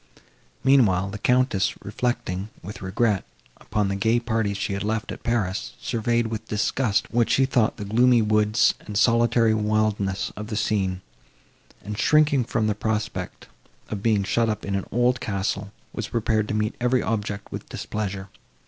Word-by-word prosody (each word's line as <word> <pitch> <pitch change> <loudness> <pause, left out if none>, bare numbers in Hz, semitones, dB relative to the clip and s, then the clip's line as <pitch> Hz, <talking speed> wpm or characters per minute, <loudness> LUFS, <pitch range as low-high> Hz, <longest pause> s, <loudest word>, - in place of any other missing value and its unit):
Meanwhile, 100 -9 +4
the 105 - -6
Countess, 125 -4 +2
reflecting, 100 -3 -2
with 100 +4 -8
regret, 95 +2 +1 0.3
upon 105 -2 -1
the 100 - -1
gay 110 +4 +2
parties 110 -4 -1
she 100 - -2
had 100 - -3
left 110 +3 -2
at - - -7
Paris, 95 - -1
surveyed, 120 +1 0
with 110 0 -5
disgust, 105 +1 0
what 120 -1 +2
she 135 - +4
thought 120 -4 +1
the 105 - -5
gloomy 120 +4 +4
woods 105 +1 +3
and 105 -1 -5
solitary 115 0 +4
wildness 105 -2 0
of 105 +1 -6
the 110 - -4
scene; 95 -3 0 0.8
and, 105 +1 -5
shrinking 145 -2 +4
from 115 -1 0
the 105 - +2
prospect 105 0 -3 0.4
of 105 -2 -4
being 105 -2 +2
shut 115 +3 +1
up 105 0 -3
in 100 - -3
an 95 -1 -2
old 120 +2 +2
castle, 100 -1 -2 0.2
was - - -4
prepared 110 -2 0
to 105 - -2
meet 105 +1 0
every 125 +1 +2
object 105 -2 -3
with - - -7
displeasure. 100 -2 -4
110 Hz, 165 wpm, -24 LUFS, 100-115 Hz, 0.8 s, Meanwhile